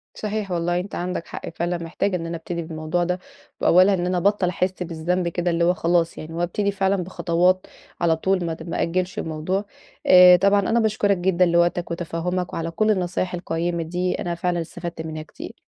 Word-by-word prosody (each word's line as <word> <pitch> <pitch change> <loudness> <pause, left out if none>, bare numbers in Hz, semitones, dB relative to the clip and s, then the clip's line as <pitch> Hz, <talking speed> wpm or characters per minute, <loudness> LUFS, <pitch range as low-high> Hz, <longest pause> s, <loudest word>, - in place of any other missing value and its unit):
صحيح 210 -2 -3
والله 175 0 0
أنت 190 +3 -6
عندك 180 -1 -3
حق - - -7
فعلًا 175 +1 -1
محتاجة 170 +3 -2
إن 165 -2 -3
أنا 165 0 -4
أبتدي 170 +1 -5
بالموضوع 160 +1 -2
ده، 180 +1 -1 0.4
وأولها 185 +3 +5
إن 175 -2 0
أنا 180 0 0
أبطّل 195 0 +2
أحس 185 +1 -1
بالذنب 175 +2 -1
كده 175 +1 -1
اللي 170 0 +1
هو 175 +1 +4
خلاص 170 -1 +1
يعني، 155 +1 -8
وأبتدي 175 +4 -1
فعلًا 195 0 +1
بخطوات 180 +1 +1 0.3
على 165 -1 +3
طول 185 +2 0
ما 165 - -2
د 160 +1 -9
ما - - -2
أأجّلش 185 +2 -1
الموضوع، 160 +6 -2 0.4
آآ 180 -1 +9
طبعًا 200 +3 +4
أنا 225 +4 +1
باشكرك 210 -3 +2
جدًا 180 0 +2
لوقتك، 170 0 +1
وتفهُّمك 175 +2 -3
وعلى 165 0 -3
كلّ 215 +6 +2
النصايح 180 -2 -1
القيّمة 170 -1 -2
دي، 180 +2 -1
أنا 175 -1 -2
فعلًا 175 0 -1
استفدت 170 0 -6
منها 155 -1 -6
كتير. - - -11
175 Hz, 190 wpm, -23 LUFS, 170-185 Hz, 0.4 s, آآ